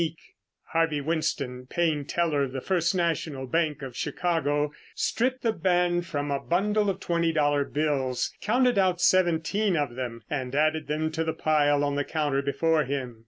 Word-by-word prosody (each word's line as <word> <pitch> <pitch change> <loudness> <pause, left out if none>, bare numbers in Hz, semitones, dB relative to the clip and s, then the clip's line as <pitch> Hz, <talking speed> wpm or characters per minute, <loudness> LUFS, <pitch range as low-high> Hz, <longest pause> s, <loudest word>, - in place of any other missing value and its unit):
_"] 165 -1 -1 0.6
Harvey 165 -2 +1
Winston, 140 -5 -2
paying 160 -1 0
teller 160 -3 0
of 135 -2 -2
the 135 - -2
First 175 +3 0
National 160 -6 -1
Bank 155 0 0
of 130 -3 -7
Chicago, 150 -4 0 0.2
stripped 255 +2 0
the 225 -2 +2
band 175 -1 +1
from 145 -2 -3
a 140 - 0
bundle 205 +7 +1
of 195 - -2
twenty 170 -1 0
dollar 145 -2 +2
bills, 140 -4 -1
counted 245 0 +2
out 185 -2 +2
seventeen 185 +2 +2
of 145 -5 -1
them 120 -2 -5
and 130 -3 -3
added 155 0 +1
them 155 +1 -1
to 160 +1 -1
the 160 0 -1
pile 145 -2 +2
on 145 0 0
the 145 0 0
counter 145 -2 -1
before 155 +3 +1
him. 130 -4 -4
155 Hz, 170 wpm, -27 LUFS, 140-175 Hz, 0.6 s, the